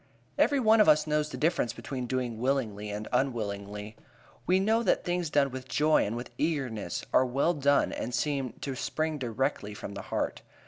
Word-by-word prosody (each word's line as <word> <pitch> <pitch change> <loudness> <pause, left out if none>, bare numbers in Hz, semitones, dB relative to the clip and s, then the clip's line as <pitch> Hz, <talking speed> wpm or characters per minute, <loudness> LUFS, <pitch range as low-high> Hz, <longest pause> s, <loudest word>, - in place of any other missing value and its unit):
Every 285 -1 +3
one 220 -2 +5
of 210 - +6
us 155 0 +5
knows 150 0 0
the - - -6
difference 160 -6 +1
between 125 -3 -5
doing 125 -3 -2
willingly 115 -5 -1
and 105 +1 -5
unwillingly. 105 -4 -2 0.5
We 185 +1 +4
know 220 +4 +2
that - - +2
things 175 -2 -1
done 140 -2 +2
with 130 0 -7
joy 155 -5 +3
and 110 - -3
with 120 +1 -6
eagerness 130 - -2
are - - +6
well 135 +7 +1
done 140 -2 +2
and 120 - -4
seem 135 0 -1
to 140 - -3
spring 155 +4 -2
directly 120 -3 -2
from 100 - -7
the 100 - -6
heart. - - -2
135 Hz, 185 wpm, -29 LUFS, 115-155 Hz, 0.5 s, of